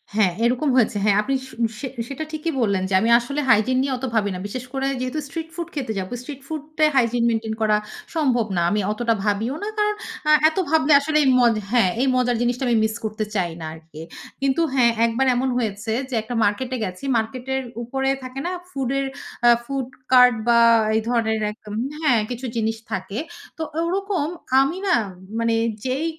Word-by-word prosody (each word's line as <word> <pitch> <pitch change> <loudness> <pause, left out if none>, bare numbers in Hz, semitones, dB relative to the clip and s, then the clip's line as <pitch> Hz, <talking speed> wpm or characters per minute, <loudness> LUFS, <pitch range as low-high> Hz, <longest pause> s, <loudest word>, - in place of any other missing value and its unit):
হ্যা, 215 -3 +4 0.2
এরকম 255 +5 +1
হয়েছে। 230 -4 +3
হ্যা, 210 - +4
আপনি 270 +5 -1
স - - -14 0.3
সে 265 - -4 0.2
সেটা 280 +3 -4
ঠিকই 315 +1 -2
বললেন 200 -4 +1
যে - - -3
আমি 225 - +1
আসলে 280 +5 -4
hygine 255 +2 +4
নিয়ে 275 -1 -1
অত 265 - -4
ভাবি 205 -2 +2
না। 180 - -5
বিশেষ 250 +4 -5
করে 270 0 -1
যেহেতু 255 +4 -2
street 325 +3 -6
food 340 -2 -4
খেতে 265 -6 -2
যাবো। 185 0 -5
Street 275 +1 -9
food 315 -2 -4 0.2
এ - - +6
hygine 240 -2 +2
maintain 225 -1 -1
করা 215 -1 +3 0.4
সম্ভব 255 -8 +2
না। 175 - +1
আমি 210 - +1
অতটা 230 +2 0
ভাবিও 215 +6 0
না। - - -2
কারণ 420 0 +1 0.3
আ - - +6 0.2
এত 315 - -11
ভাবলে 315 -2 +4
আসলে 305 +2 0
এই 275 - +2
ম - - +4 0.3
হ্যা, 240 -4 +4 0.2
এই 270 - +2
মজার 245 -1 +2
জিনিসটা 245 +2 0
আমি 240 - +3
মিস 220 0 0
করতে 215 0 -2
চাই 180 -4 0
না 160 - -6
আরকি। 160 -1 -12 0.4
কিন্তু 275 +4 +1
হ্যা, 255 -3 +4 0.2
একবার 230 +3 +1
এমন 260 +2 0
হয়েছে 220 -1 -2 0.2
যে - - -7
একটা 225 - -6
মার্কেটে 245 +6 0
গেছি। 185 +5 -7
মার্কেটের 255 +4 -2 0.2
উপরে 270 +3 -1
থাকে 255 +1 -6
না - - -2 0.2
ফুড 270 -8 -3
এর 275 - -1 0.4
আ - - +9 0.2
food 270 -1 -3 0.2
cart 250 -1 +7
বা 235 -1 +5 0.4
এই 220 - +2
ধরনের 225 -2 +1
এক 210 - -14
আম 210 - -5 0.2
হ্যা, 305 -5 +3 0.2
কিছু 250 +1 -5
জিনিস 225 0 0
থাকে। 195 +3 -3 0.4
তো 320 - -3 0.2
ওরকম 380 -3 -1 0.3
আমি 275 +7 0
না 370 - +4 0.4
মানে 230 0 +1 0.3
যেই 260 +5 -1
245 Hz, 200 wpm, -22 LUFS, 220-275 Hz, 0.4 s, আ